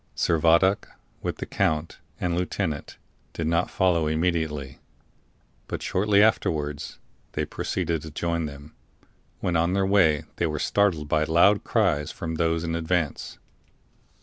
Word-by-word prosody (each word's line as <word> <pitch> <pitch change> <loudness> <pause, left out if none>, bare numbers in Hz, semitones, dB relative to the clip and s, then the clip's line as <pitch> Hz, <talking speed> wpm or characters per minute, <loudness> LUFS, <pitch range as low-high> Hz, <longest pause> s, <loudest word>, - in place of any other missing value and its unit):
Servadac, 85 +4 +3 0.3
with - - -3
the - - -5
count 80 +1 -1 0.2
and 90 - -1
lieutenant, 90 -4 -3 0.4
did 80 - -3
not 85 +1 +1
follow 90 -5 +2
immediately; 80 -4 -1 0.9
but - - -5
shortly 100 +2 +3
afterwards 75 -8 0 0.4
they - - -1
proceeded 80 -2 -2
to 80 - -8
join 85 +1 -2
them, 70 +1 -11 0.7
when 90 - 0
on 85 +2 +2
their 95 0 +2
way 90 -7 +3
they 85 - +1
were 75 -1 -3
startled 85 -3 +1
by 75 +1 +2
loud 85 +6 +4
cries 90 -10 +1
from 80 - -5
those 80 0 0
in 85 -1 -2
advance. 85 -2 -2
80 Hz, 135 wpm, -25 LUFS, 75-90 Hz, 0.9 s, loud